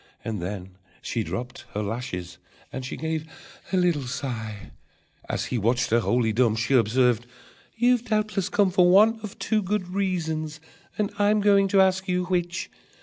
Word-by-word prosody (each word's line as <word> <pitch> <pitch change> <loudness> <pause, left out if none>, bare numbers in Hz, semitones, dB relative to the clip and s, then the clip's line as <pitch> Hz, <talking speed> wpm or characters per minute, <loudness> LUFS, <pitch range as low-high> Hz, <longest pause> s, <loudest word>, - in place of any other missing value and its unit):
And 110 -5 -3
then 95 0 -6 0.2
she 115 - -2
dropped 125 +3 -6
her 105 - -1
lashes 100 -5 -5 0.3
and 130 - -4
she 130 - -5
gave 160 +1 -3 0.4
a 190 - +2
little 170 -7 +1
sigh. 115 -5 -5 0.6
As - - -1
he 125 - -2
watched 115 +3 +1
her, 115 - +5
wholly 120 -1 +1
dumb, 115 -1 +3
She 115 +4 0
observed: 120 0 +3 0.5
"You 245 +2 +3
doubtless 215 -4 -1
come 200 -2 +2
For 180 -1 +5
one 215 +5 +5
of 210 -2 -8
two 220 -1 0
good 190 -1 -2
reasons, 160 -5 -2 0.4
and 210 -1 0
I'm 205 +1 +4
going 200 -1 +4
to 195 0 +4
ask 190 0 +2
you 180 0 0
which. 175 -1 -2
160 Hz, 165 wpm, -25 LUFS, 120-195 Hz, 0.6 s, her